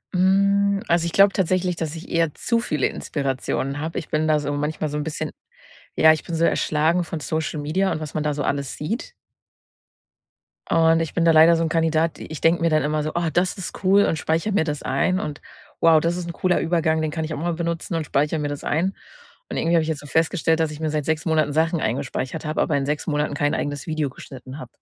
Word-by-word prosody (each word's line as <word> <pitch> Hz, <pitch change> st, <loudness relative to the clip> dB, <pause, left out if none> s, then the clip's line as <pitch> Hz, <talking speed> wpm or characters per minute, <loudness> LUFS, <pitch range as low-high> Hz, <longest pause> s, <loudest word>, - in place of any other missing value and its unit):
Hm, 200 Hz, +2 st, +3 dB
also, 170 Hz, 0 st, +2 dB
ich -, -, -3 dB
glaube 195 Hz, +3 st, +5 dB
tatsächlich, 185 Hz, -1 st, 0 dB
dass 160 Hz, -1 st, -4 dB
ich 165 Hz, -, -9 dB
eher 165 Hz, -3 st, +1 dB
zu 235 Hz, -1 st, 0 dB
viele 150 Hz, -, 0 dB
Inspirationen 135 Hz, 0 st, -3 dB
habe. 160 Hz, +2 st, -4 dB
Ich 160 Hz, -, -5 dB
bin 155 Hz, +1 st, 0 dB
da 155 Hz, -1 st, +3 dB
so 145 Hz, 0 st, -3 dB
manchmal 150 Hz, +1 st, -2 dB
so 150 Hz, -, -3 dB
'n 150 Hz, -, -2 dB
bisschen 160 Hz, -1 st, -4 dB, 0.6 s
ja, 160 Hz, -, +6 dB
ich 155 Hz, -, -7 dB
bin 170 Hz, -, -5 dB
so 165 Hz, +1 st, +1 dB
erschlagen 160 Hz, +4 st, +1 dB
von 165 Hz, -1 st, -5 dB
Social 155 Hz, 0 st, -3 dB
Media 185 Hz, +7 st, 0 dB
und -, -, -3 dB
was 155 Hz, -3 st, -7 dB
man 155 Hz, -, -1 dB
da 150 Hz, -, +1 dB
so 145 Hz, 0 st, -3 dB
alles 140 Hz, -2 st, -2 dB
sieht. 220 Hz, -, -4 dB, 1.6 s
Und 165 Hz, 0 st, +4 dB
ich 165 Hz, -, -3 dB
bin 170 Hz, -, +1 dB
da 165 Hz, -, +6 dB
leider 160 Hz, +1 st, +7 dB
so 165 Hz, -, 0 dB
'n 165 Hz, -, 0 dB
Kandidat. 165 Hz, 0 st, +1 dB
I -, -, -8 dB
ich 155 Hz, -, -7 dB
denke 165 Hz, +1 st, +3 dB
mir 165 Hz, -, +3 dB
dann 155 Hz, -1 st, +2 dB
immer 150 Hz, +1 st, 0 dB
so: 155 Hz, -, -2 dB
„Ah, 170 Hz, -1 st, 0 dB
das 175 Hz, +6 st, 0 dB
ist 190 Hz, +1 st, -7 dB
cool“ 195 Hz, +2 st, +5 dB
und 160 Hz, -, 0 dB
speichere 165 Hz, +8 st, -1 dB
mir 195 Hz, -, +3 dB
das 150 Hz, -2 st, -3 dB
ein. 185 Hz, +8 st, 0 dB
Und: 150 Hz, -3 st, -5 dB, 0.4 s
„Wow, 165 Hz, -1 st, +6 dB
das 170 Hz, +2 st, 0 dB
ist 180 Hz, -1 st, -4 dB
'n 170 Hz, -, -3 dB
cooler 180 Hz, +1 st, +1 dB
Übergang, 160 Hz, -1 st, +1 dB
den 155 Hz, -1 st, -1 dB
kann 160 Hz, 0 st, -3 dB
ich 155 Hz, -, -5 dB
auch -, -, -4 dB
mal 170 Hz, +3 st, -1 dB
benutzen“ 170 Hz, +1 st, -3 dB
und 160 Hz, -, -2 dB
speichere 150 Hz, +3 st, 0 dB
mir 150 Hz, -, -1 dB
das 145 Hz, -1 st, -5 dB
ein. 180 Hz, +6 st, 0 dB, 0.5 s
Und -, -, -4 dB
irgendwie 170 Hz, +1 st, +1 dB
habe 165 Hz, -, +4 dB
ich 155 Hz, -, -4 dB
jetzt 155 Hz, -2 st, -2 dB
so 145 Hz, -, -11 dB
festgestellt, 160 Hz, +1 st, +1 dB
dass 160 Hz, -1 st, 0 dB
ich 150 Hz, -, -8 dB
mir 160 Hz, -1 st, -1 dB
seit 150 Hz, -1 st, -1 dB
6 160 Hz, 0 st, -1 dB
Monaten 155 Hz, -3 st, +2 dB
Sachen 160 Hz, +2 st, +1 dB
eingespeichert 130 Hz, +5 st, -3 dB
habe, 155 Hz, -, -1 dB
aber 145 Hz, -, +1 dB
in 135 Hz, -, -1 dB
6 150 Hz, +1 st, -2 dB
Monaten 150 Hz, -1 st, 0 dB
kein 145 Hz, 0 st, 0 dB
eigenes 145 Hz, +1 st, -3 dB
Video 155 Hz, -3 st, -1 dB
geschnitten 130 Hz, 0 st, -10 dB
habe. 150 Hz, -, -8 dB
160 Hz, 245 wpm, -23 LUFS, 150-170 Hz, 1.6 s, leider